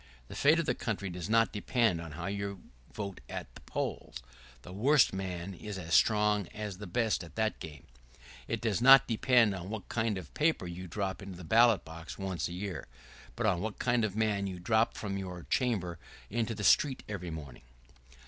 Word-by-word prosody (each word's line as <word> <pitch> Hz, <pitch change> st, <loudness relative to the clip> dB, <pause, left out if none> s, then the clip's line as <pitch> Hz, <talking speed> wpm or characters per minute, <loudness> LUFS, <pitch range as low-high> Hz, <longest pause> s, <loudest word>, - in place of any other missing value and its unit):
The -, -, -8 dB
fate 150 Hz, +3 st, +5 dB
of 165 Hz, -, 0 dB
the -, -, +1 dB
country 100 Hz, -5 st, -3 dB
does 90 Hz, +2 st, -5 dB
not 115 Hz, 0 st, +3 dB
depend 105 Hz, -4 st, +1 dB
on 80 Hz, -2 st, -8 dB
how 85 Hz, +3 st, -6 dB
you 100 Hz, -1 st, -4 dB, 0.3 s
vote 100 Hz, -3 st, -6 dB
at -, -, -6 dB
the -, -, -13 dB
polls -, -, -4 dB, 0.2 s
— 65 Hz, -1 st, -22 dB
the 90 Hz, -, -10 dB
worst 130 Hz, +6 st, +4 dB
man 95 Hz, -1 st, -4 dB
is 105 Hz, +2 st, -7 dB
as 85 Hz, -2 st, -5 dB
strong 105 Hz, -3 st, +4 dB
as 105 Hz, -3 st, -5 dB
the 105 Hz, -, -7 dB
best 110 Hz, +2 st, 0 dB
at 80 Hz, -4 st, -13 dB
that 110 Hz, 0 st, 0 dB
game; 75 Hz, -3 st, -9 dB, 0.6 s
it -, -, -2 dB
does 110 Hz, -3 st, 0 dB
not 135 Hz, +1 st, +8 dB
depend 115 Hz, -1 st, +4 dB
on 95 Hz, 0 st, -6 dB
what 110 Hz, -2 st, -6 dB
kind 110 Hz, -3 st, 0 dB
of 90 Hz, -5 st, -9 dB
paper 155 Hz, -, +1 dB
you 90 Hz, +1 st, -6 dB
drop 95 Hz, +2 st, -3 dB
into 100 Hz, -2 st, -8 dB
the 90 Hz, -, -9 dB
ballot 115 Hz, +3 st, +4 dB
box 80 Hz, 0 st, -9 dB
once 95 Hz, -3 st, -2 dB
a 85 Hz, -, -7 dB
year, 95 Hz, -1 st, -5 dB, 0.5 s
but 115 Hz, -, -2 dB
on 90 Hz, -5 st, +2 dB
what 110 Hz, 0 st, -4 dB
kind 120 Hz, -2 st, +1 dB
of 105 Hz, -2 st, -1 dB
man 105 Hz, -2 st, +1 dB
you 95 Hz, -1 st, -5 dB
drop 110 Hz, +6 st, +2 dB
from 100 Hz, -2 st, -3 dB
your 90 Hz, -2 st, -6 dB
chamber 95 Hz, -10 st, 0 dB, 0.3 s
into 115 Hz, 0 st, -1 dB
the 105 Hz, -, -5 dB
street 135 Hz, +4 st, +4 dB
every 90 Hz, -4 st, -5 dB
morning. 75 Hz, -7 st, -8 dB
100 Hz, 205 wpm, -31 LUFS, 90-110 Hz, 0.6 s, not